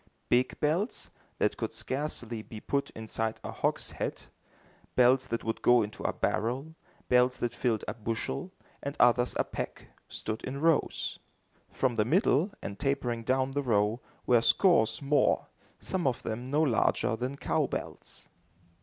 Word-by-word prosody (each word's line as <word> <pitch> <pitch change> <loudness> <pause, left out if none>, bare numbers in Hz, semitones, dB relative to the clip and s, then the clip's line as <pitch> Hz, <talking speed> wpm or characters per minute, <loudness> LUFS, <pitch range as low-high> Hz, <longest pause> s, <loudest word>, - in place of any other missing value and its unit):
Big 125 +1 +2
bells, 165 +8 0 0.3
that - - +1
could - - -2
scarcely 125 -5 -3
be 110 0 -9
put 140 +5 -1
inside 110 0 -3
a - - -5
hogshead, - - -2 0.7
bells 130 +1 +5
that 115 - -2
would 110 - -2
go 120 -2 +5
into 105 +1 -7
a - - 0
barrel, 125 +8 -1 0.3
bells 125 0 +4
that 120 -1 -2
filled 115 -3 0
a - - -2
bushel, 115 - -3 0.3
and 140 +1 -5
others 120 0 +4
a - - +3
peck, - - -6 0.2
stood 110 +1 -5
in 135 +2 -4
rows. 165 0 +1 0.5
From 125 -3 0
the 105 - +4
middle, 165 - +3
and 100 - -6
tapering 125 -4 -1
down 130 +2 +1
the 145 +1 0
row, 110 -2 +1 0.2
were 120 -2 +5
scores 115 - +3
more, 145 +1 +2 0.3
some 185 -6 -2
of 125 - -1
them 120 +3 -4
no 150 +3 +3
larger 115 -4 +2
than 125 +4 -4
cow - - +1
bells. - - -7
125 Hz, 155 wpm, -30 LUFS, 115-140 Hz, 0.7 s, bells